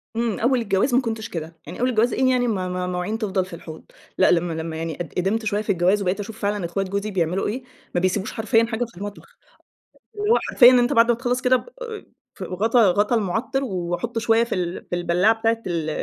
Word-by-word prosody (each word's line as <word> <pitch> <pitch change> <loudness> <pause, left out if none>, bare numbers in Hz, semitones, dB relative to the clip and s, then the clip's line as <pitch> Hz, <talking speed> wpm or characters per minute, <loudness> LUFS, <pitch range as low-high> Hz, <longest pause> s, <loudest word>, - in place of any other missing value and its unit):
إمم، 230 -1 -1
أول 245 +1 +2
الجواز 220 +4 +1
ما 255 - +4
كنتش 225 -3 -4
كده، 165 -1 -6
يعني 175 - -8
أول 250 +2 +2
الجواز 235 0 +2
إيه 260 0 +2
يعني 250 -1 +2
م 225 - 0
م 180 -1 -3
مواعين 180 +5 -2
تفضل 195 -4 -1
في 185 - -13
الحوض؟ 160 -1 -9 0.3
لأ، - - +5
لمّا 170 -1 +1
لمّا 160 0 -4
يعني 165 -1 -4
قد 175 +1 -7
قدمت 210 +5 0
شوية 210 -1 0
في 210 - -1
الجواز 185 +3 +2
وبقيت 190 +1 -1
أشوف 215 +2 -7
فعلًا 205 -2 -1
أخوات 190 +3 -3
جوزي 200 +2 -2
بيعملوا 180 0 0
إيه، 250 +5 -4 0.3
ما 175 - +3
بيسيبوش 190 +3 -1
حرفيًا 225 +1 +2
حاجة 235 +1 -2
في 230 - -17
المطبخ، 205 - -9 0.8
وهو 415 +3 +2
حرفيًا 245 -1 +8
أنت 245 -1 +3
بعد 230 +1 +5
ما 235 - 0
تخلّص 250 0 -1
كده 255 0 +4
ب - - -10 0.2
آآ، 455 -3 -7 0.3
في - - -7
غطا 215 +2 +3
غطا 205 +5 +2
المعطِّر 225 +6 -1
واحط 185 +1 -3
شوية 225 0 +3
في 235 - -3
ال 180 -1 -3
في - - -1
البلاعة 175 +5 +3
بتاعة 225 0 +1
ال 165 -3 -2
210 Hz, 225 wpm, -23 LUFS, 180-235 Hz, 0.8 s, حرفيًا